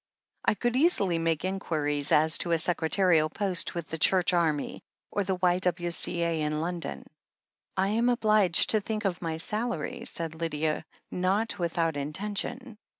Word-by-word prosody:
I -, -, +3 dB
could 240 Hz, +2 st, -1 dB
easily 205 Hz, -, +3 dB
make 165 Hz, 0 st, 0 dB
inquiries 150 Hz, -6 st, -1 dB
as 155 Hz, +2 st, +4 dB
to 170 Hz, -, -1 dB
a -, -, +4 dB
secretarial 165 Hz, -1 st, +2 dB
post 185 Hz, 0 st, -2 dB
with 170 Hz, -2 st, -4 dB
the 160 Hz, -, -5 dB
Church 185 Hz, +1 st, +3 dB
Army 160 Hz, -4 st, 0 dB, 0.3 s
or 205 Hz, -, 0 dB
the 190 Hz, 0 st, -1 dB
Y.W.C. 175 Hz, -1 st, 0 dB
A. 165 Hz, -2 st, 0 dB
in 150 Hz, 0 st, -1 dB
London." 170 Hz, +1 st, -4 dB, 0.7 s
"I 190 Hz, +1 st, +2 dB
am 230 Hz, +3 st, +2 dB
obliged 215 Hz, -7 st, +3 dB
to 215 Hz, -, +3 dB
think 215 Hz, +1 st, -4 dB
of 185 Hz, -2 st, -1 dB
my 165 Hz, -2 st, -3 dB
salary," 235 Hz, +5 st, -3 dB
said 165 Hz, -10 st, -2 dB
Lydia, 160 Hz, -1 st, -2 dB, 0.3 s
not 200 Hz, +3 st, 0 dB
without 165 Hz, -2 st, 0 dB
intention. 210 Hz, -, -4 dB
175 Hz, 150 wpm, -28 LUFS, 160-205 Hz, 0.7 s, as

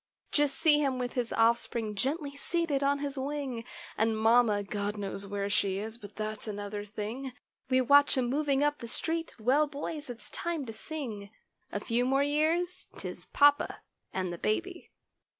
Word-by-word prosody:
Just 290 Hz, -2 st, +2 dB
see 305 Hz, -3 st, +5 dB
him 270 Hz, -3 st, +1 dB
with 250 Hz, -1 st, -3 dB
his 245 Hz, -3 st, -1 dB
offspring, 225 Hz, -1 st, +2 dB
gently 280 Hz, -, -2 dB
seated 320 Hz, -1 st, 0 dB
on 280 Hz, 0 st, +3 dB
his 280 Hz, -1 st, -3 dB
"wing" 270 Hz, -4 st, -3 dB, 0.3 s
And 220 Hz, 0 st, +2 dB
mamma—God 210 Hz, -2 st, +2 dB
knows 200 Hz, 0 st, -4 dB
where 200 Hz, 0 st, -2 dB
she 200 Hz, -2 st, +1 dB
is—but 215 Hz, 0 st, -6 dB
that's 215 Hz, 0 st, -4 dB
another 205 Hz, 0 st, -4 dB
thing— 220 Hz, +6 st, -5 dB, 0.4 s
We 260 Hz, 0 st, +4 dB
watch 285 Hz, +2 st, +6 dB
him 250 Hz, -2 st, +2 dB
moving 280 Hz, +1 st, +1 dB
up 295 Hz, 0 st, +1 dB
the 235 Hz, -, -6 dB
street—well, 300 Hz, -1 st, +1 dB
boys, 295 Hz, 0 st, -5 dB
it's 240 Hz, -1 st, -8 dB
time 335 Hz, -5 st, -2 dB
to 225 Hz, -, -6 dB
sing— 220 Hz, -6 st, -6 dB, 0.4 s
A 205 Hz, -, -2 dB
few 235 Hz, +3 st, 0 dB
more 270 Hz, +2 st, +3 dB
years—'tis 325 Hz, +5 st, -1 dB
papa 290 Hz, 0 st, +4 dB, 0.3 s
and 185 Hz, -2 st, -2 dB
the 170 Hz, -, -7 dB
baby. 345 Hz, -, -2 dB
255 Hz, 155 wpm, -30 LUFS, 215-290 Hz, 0.4 s, watch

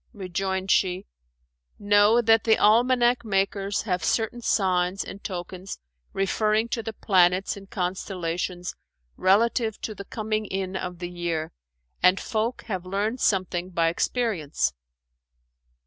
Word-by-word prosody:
Rejoined 190 Hz, 0 st, -2 dB
she, 185 Hz, +1 st, +2 dB, 0.7 s
"Know 205 Hz, +3 st, +4 dB
that 225 Hz, 0 st, +4 dB
the 220 Hz, -1 st, +4 dB
almanack 245 Hz, +3 st, +4 dB
makers 195 Hz, -1 st, 0 dB
have 180 Hz, -5 st, -1 dB
certain 230 Hz, +1 st, 0 dB
signs 185 Hz, -3 st, +1 dB
and 200 Hz, -, -10 dB
tokens, 185 Hz, 0 st, -6 dB, 0.3 s
referring 215 Hz, +3 st, +1 dB
to 230 Hz, -, -2 dB
the 225 Hz, 0 st, -6 dB
planets 185 Hz, -2 st, +2 dB
and 195 Hz, -1 st, -12 dB
constellations 180 Hz, -1 st, -3 dB, 0.4 s
relative 220 Hz, +3 st, +2 dB
to 215 Hz, -, -4 dB
the 200 Hz, -1 st, -9 dB
coming 215 Hz, 0 st, -3 dB
in 190 Hz, 0 st, -3 dB
of 180 Hz, -1 st, -4 dB
the 175 Hz, 0 st, -6 dB
year; 170 Hz, -2 st, -3 dB, 0.5 s
and 180 Hz, +1 st, +5 dB
folk 230 Hz, +1 st, -2 dB
have 190 Hz, -6 st, -4 dB
learned 205 Hz, +6 st, -2 dB
something 185 Hz, -2 st, 0 dB
by 170 Hz, -2 st, +1 dB
experience." 170 Hz, -, -1 dB
195 Hz, 125 wpm, -25 LUFS, 180-220 Hz, 0.7 s, and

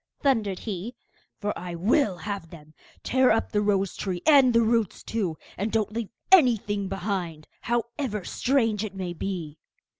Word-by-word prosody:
thundered 220 Hz, -9 st, +2 dB
he, 210 Hz, +4 st, -5 dB, 0.4 s
'for 205 Hz, -1 st, -1 dB
I 175 Hz, -1 st, -6 dB
will 200 Hz, -, +2 dB
have 200 Hz, -5 st, -4 dB
them! 155 Hz, -2 st, -14 dB, 0.3 s
Tear 260 Hz, 0 st, +3 dB
up 225 Hz, -, +1 dB
the 210 Hz, -, +1 dB
rose 195 Hz, -2 st, +1 dB
tree 185 Hz, -3 st, -4 dB
and 280 Hz, -5 st, +7 dB
the 230 Hz, 0 st, +4 dB
roots 225 Hz, -3 st, 0 dB
too, 190 Hz, -8 st, -2 dB, 0.2 s
and 210 Hz, +3 st, -1 dB
don't 215 Hz, -1 st, 0 dB
leave 230 Hz, -2 st, -3 dB, 0.2 s
anything 220 Hz, -, +4 dB
behind, 185 Hz, -5 st, -3 dB
however 235 Hz, -2 st, -2 dB
strange 225 Hz, -6 st, +1 dB
it 200 Hz, -3 st, -6 dB
may 185 Hz, -2 st, -4 dB
be! 170 Hz, -4 st, -5 dB
205 Hz, 155 wpm, -26 LUFS, 185-230 Hz, 0.4 s, and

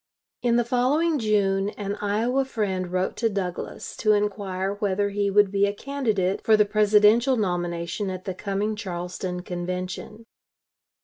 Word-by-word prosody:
In 240 Hz, -1 st, +2 dB
the 240 Hz, -1 st, +2 dB
following 285 Hz, +7 st, +2 dB
June, 200 Hz, -3 st, +1 dB
an 205 Hz, -1 st, -3 dB
Iowa 225 Hz, +6 st, +1 dB
friend 190 Hz, -8 st, -2 dB
wrote 185 Hz, +1 st, -1 dB
to 230 Hz, -, +1 dB
Douglas 190 Hz, -4 st, -4 dB
to 215 Hz, -1 st, +3 dB
inquire 200 Hz, -2 st, -1 dB
whether 205 Hz, -1 st, 0 dB
he 200 Hz, 0 st, 0 dB
would 200 Hz, 0 st, +4 dB
be 200 Hz, 0 st, +3 dB
a 200 Hz, -, -3 dB
candidate 215 Hz, -8 st, -1 dB
for 220 Hz, -1 st, +5 dB
the 210 Hz, -, +5 dB
Presidential 215 Hz, +4 st, +4 dB
nomination 175 Hz, -1 st, -2 dB
at 185 Hz, 0 st, -6 dB
the 190 Hz, -, -3 dB
coming 200 Hz, +3 st, -2 dB
Charleston 180 Hz, -2 st, -5 dB
Convention. 180 Hz, +5 st, -5 dB
205 Hz, 145 wpm, -25 LUFS, 185-215 Hz, -, for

